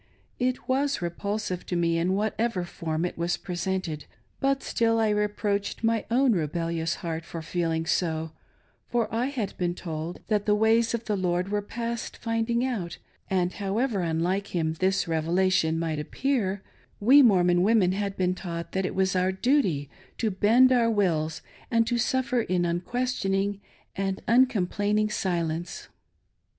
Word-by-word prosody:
It 255 0 -1
was 275 +2 +1
repulsive 185 +2 -3
to 180 - -2
me 170 -1 +1
in 180 +3 +1
whatever 215 -1 -1
form 165 -1 -3
it 175 - -5
was 170 +1 0
presented, 180 -4 -3 0.3
but 275 0 +1
still 225 -1 +1
I 220 -1 +2
reproached 210 0 -1
my 225 -1 +1
own 255 +2 +4
rebellious 165 -2 -1
heart 165 -1 -3
for 165 -1 -7
feeling 165 0 -1
so, 160 -1 -1 0.6
for 235 -3 -1
I 235 +3 +1
had 250 -8 -3
been 175 -1 0
told 165 -1 -5
that 210 -1 0
the 210 - +4
ways 225 +2 +3
of 230 - -6
the 210 - 0
Lord 180 0 0
were 205 0 0
past 235 +2 -5
finding 230 +1 0
out, 200 -10 -3 0.3
and 180 -1 +1
however 210 +3 -1
unlike 175 +4 -1
Him 160 -2 0
this 190 0 +1
Revelation 165 +1 +1
rnight 160 -2 -2
appear, 200 - -1 0.4
we 260 +8 +7
Mormon 180 -7 +4
women 200 -2 +4
had 200 0 -2
been 180 -1 +1
taught 170 -2 -6
that 190 -1 0
it - - -6
was 190 0 +1
our 185 +1 +2
duty 190 - +1 0.3
to 220 -2 0
bend 230 +7 +5
our 240 -2 +4
wills 165 -7 0 0.3
and 230 -1 +3
to 240 +1 0
suffer 255 0 +1
in 180 -4 0
unquestioning 195 +1 -1 0.3
and 195 0 -2
uncomplaining 215 -3 +2
silence. 170 -2 -2
195 Hz, 155 wpm, -27 LUFS, 175-225 Hz, 0.6 s, we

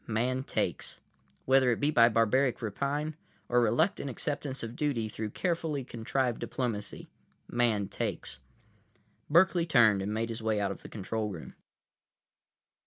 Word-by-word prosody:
Man 125 +4 0
takes. - - -2 0.5
Whether 130 -1 +5
it 120 - +1
be 145 +1 +2
by 115 -5 +6
barbaric 120 +3 +2
rapine, 140 +8 -2 0.3
or 125 0 +3
reluctant 140 - +1
acceptance 135 +1 -3
of 115 +1 -5
duty 130 -7 0
through 110 0 -4
carefully 160 - -1
contrived 120 +1 -1
diplomacy, 110 -6 -3 0.4
Man 115 -5 +1
takes. 65 -7 -3 0.9
Berkeley 170 +1 +4
turned 110 -9 +5
and 100 +2 -2
made 115 +2 -1
his 115 0 -5
way 110 -1 +1
out 100 -1 0
of - - -8
the - - -10
control 110 +1 -3
room. 85 -6 -8
120 Hz, 140 wpm, -30 LUFS, 110-140 Hz, 0.9 s, by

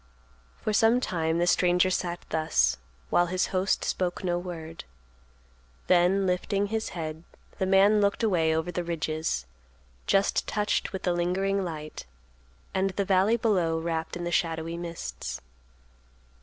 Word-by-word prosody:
For 215 - 0
some 225 +3 +4
time 165 -8 -1
the 175 - +2
stranger 180 +1 +3
sat 175 -1 -2
thus, 65 - +2 0.3
while 175 - +4
his 185 +1 0
host 185 +1 +1
spoke 180 0 -2
no 175 -1 0
word. 165 -2 -7 1.0
Then 180 +2 +3
lifting 190 +2 0
his 220 +2 -2
head, 160 0 -5 0.4
the 190 - +1
man 200 +2 +5
looked 200 +3 +1
away 165 -7 +2
over 160 +2 -1
the 175 0 -2
ridges 160 -1 -2 0.6
just 195 0 +2
touched 210 -1 0
with 190 - -5
the 180 - +1
lingering 190 +3 0
light, 155 - -6 0.7
and 190 +1 +1
the 195 +1 -2
valley 195 +4 +3
below 180 -8 +1
wrapped 165 0 -3
in 175 - -5
the 175 - -2
shadowy 165 -1 -1
mists. 170 - -5
175 Hz, 140 wpm, -27 LUFS, 165-195 Hz, 1.0 s, man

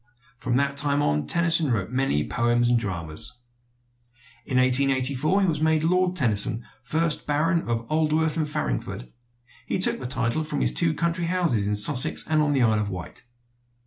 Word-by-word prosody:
From 125 0 -2
that 140 +1 -1
time 145 0 +1
on 75 0 -1
Tennyson 170 -3 +2
wrote 110 -3 -2
many 125 - -1
poems 120 0 +1
and 120 -1 +3
dramas. 85 -2 -5 1.1
In 130 - -1
1884 135 +6 +2
he - - +2
was 155 -3 -1
made 160 -1 +2
Lord 180 +2 +1
Tennyson, 115 - +1 0.2
first 160 0 -1
Baron 165 +1 0
of 115 0 -2
Aldworth 155 +1 0
and 155 -2 -1
Farringford. - - -4 0.6
He - - -1
took 185 - +2
the 125 - -5
title 125 +3 -1
from 155 - -4
his - - +1
two 80 +7 +1
country 170 0 -1
houses 165 - 0
in 105 - 0
Sussex 125 +5 +3
and 155 -1 +1
on 150 -1 +1
the 135 -3 +2
Isle 110 -2 +2
of 105 -1 -2
Wight. 90 +4 -8
135 Hz, 175 wpm, -24 LUFS, 115-155 Hz, 1.1 s, and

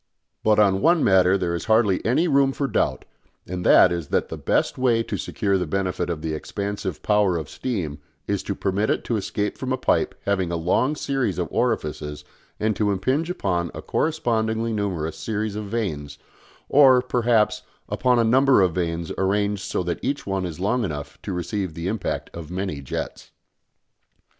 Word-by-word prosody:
But 110 -1 +4
on 100 -2 +4
one 165 +2 +4
matter 95 0 +5
there 90 -3 -1
is 85 - -3
hardly 110 -4 +3
any 135 +10 +2
room 140 -3 +3
for 140 - -1
doubt, - - 0 0.4
and 90 0 -5
that 90 - +7
is 85 -4 -3
that - - 0
the - - -4
best - - 0
way 120 -3 +3
to - - -4
secure 100 -2 -1
the 90 - -2
benefit 90 0 -1
of 80 -2 -3
the 80 -1 -2
expansive 100 +2 -4
power 105 -4 +3
of 80 -3 -5
steam 85 - -4 0.3
is 100 -2 -1
to 100 - -4
permit 100 +3 0
it - - 0
to 120 - -1
escape 105 0 -2
from 130 -1 -3
a 130 - +1
pipe - - +1
having 95 -4 0
a - - -1
long 90 - +1
series 135 - -1
of 90 -2 -1
orifices 75 -10 -2 0.3
and 110 0 +1
to 105 -1 +1
impinge 130 - 0
upon 90 - -1
a - - -6
correspondingly 115 -7 0
numerous 90 -7 -2
series 110 -1 -2
of 105 0 -4
vanes, 80 -10 -3 0.5
or, 130 -3 +6
perhaps, 115 -4 +2 0.3
upon 125 -1 +2
a 115 - +4
number 130 +3 +4
of 90 -3 +1
vanes 85 -1 -2
arranged 100 +1 +1
so 95 -1 -2
that 85 -1 -3
each 140 +2 -2
one 95 -2 -1
is 85 -1 -8
long 115 +6 +1
enough 75 -7 -5
to - - -5
receive 90 0 -3
the 85 +1 -4
impact 105 0 -3
of 80 -3 -7
many 95 -5 -3
jets. 65 - -5
100 Hz, 185 wpm, -23 LUFS, 90-115 Hz, 0.5 s, that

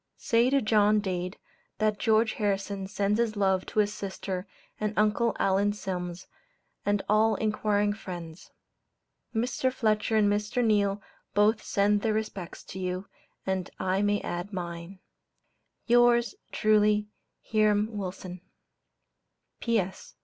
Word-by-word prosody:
Say 235 0 +2
to 275 -1 +2
John 215 -1 +4
Dade, 185 -2 -3 0.4
that 215 -1 +1
George 220 0 +3
Harrison 200 -1 -2
sends 205 +2 0
his 230 -2 +1
love 190 -2 +1
to - - -9
his 210 -1 +3
sister 190 -2 -5 0.3
and 210 0 -2
Uncle 215 +2 +2
Allen 200 +2 +2
Sims, 180 -3 -5 0.6
and 205 -1 +1
all 215 +1 +4
inquiring 210 -1 +1
friends. 175 -5 -8 0.9
Mr. 250 +3 0
Fletcher 220 -3 +1
and 215 -1 +4
Mr. 210 +4 0
Neale 205 -2 +2 0.3
both 215 +2 +4
send 205 +1 +2
their 220 0 +1
respects 210 -5 -4
to 190 - -8
you, 185 +1 -3 0.4
and 190 -2 -1
I 190 +1 +1
may 205 0 +2
add 175 +3 -4
mine. 175 0 -6 0.9
Yours 240 +1 +4 0.2
truly, 210 -1 +3 0.3
HIRAM 215 0 +2
WILSON. 185 -2 -6 1.2
P.S. 210 -6 -2
205 Hz, 125 wpm, -28 LUFS, 190-215 Hz, 1.2 s, John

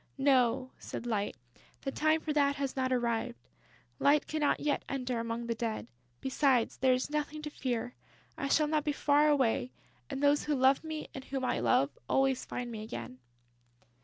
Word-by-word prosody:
"No," 260 -2 +3
said - - -6
Light. 210 -4 -1 0.5
"The 270 - -3
time 310 +3 +2
for 310 - -2
that 285 -1 +3
has 275 -2 -3
not 260 -1 0
arrived. 240 -1 0 0.6
Light 290 +1 +4
cannot 305 -2 +1
yet 295 -1 0
enter 255 -3 -2
among 230 +1 -3
the 235 - -1
Dead. 225 -1 -3 0.4
Besides, 265 -3 +2
there 260 0 +4
is 255 +3 -3
nothing 300 0 -2
to 300 - -5
fear. 245 -3 -3 0.4
I 275 - -3
shall 305 +2 +3
not 300 0 +1
be 295 -1 0
far 295 +1 +3
away; 245 - +2 0.4
and 275 - -4
those 290 0 +4
who 300 - +1
love 265 +2 +4
me 315 -1 -5
and 270 -1 -8
whom 265 -1 -3
I - - 0
love 120 +4 +2
always 270 -1 +2
find 245 -1 -5
me 220 -2 -5
again...." 125 - -7
265 Hz, 180 wpm, -31 LUFS, 235-290 Hz, 0.6 s, Light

